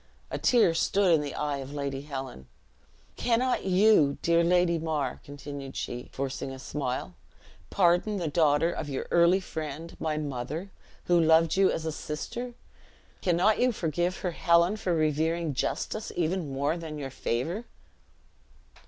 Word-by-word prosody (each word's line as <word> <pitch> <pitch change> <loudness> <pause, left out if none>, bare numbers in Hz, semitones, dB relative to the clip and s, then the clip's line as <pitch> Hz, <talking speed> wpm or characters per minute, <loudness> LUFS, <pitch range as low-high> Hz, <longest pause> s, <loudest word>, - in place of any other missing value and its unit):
A - - -3
tear 235 -9 +4
stood 190 +2 +3
in 155 - +4
the 145 -1 -5
eye 145 -1 -1
of 135 +1 -7
Lady 140 -1 -3
Helen. 135 - -7 0.7
"Cannot 245 0 +1
you, 185 -6 +4
dear 170 0 +4
Lady 175 -1 +3
Mar," 155 -5 -2
continued 140 -1 -8
she, 120 0 -5
forcing 135 0 -4
a 135 - -7
smile, 130 -6 -4 0.6
"pardon 180 +3 +2
the 175 -4 -2
daughter 155 +1 +3
of 155 -3 -5
your 135 - -3
early 170 +2 +5
friend, 160 -2 -6
my 155 -1 -1
mother, 150 +6 -4 0.3
who 175 -1 +4
loved 160 0 +4
you 195 0 +4
as 160 - -2
a 160 - -1
sister? 235 +12 -5 0.7
Cannot 185 +4 +3
you 250 0 +3
forgive 175 -2 -1
her 180 - -1
Helen 170 +3 +3
for 185 -5 -1
revering 160 +1 0
justice 215 - -2
even 170 -2 -1
more 140 +5 0
than 160 -3 -6
your 135 -2 -5
favor?" 160 - -2
160 Hz, 150 wpm, -28 LUFS, 145-180 Hz, 0.7 s, early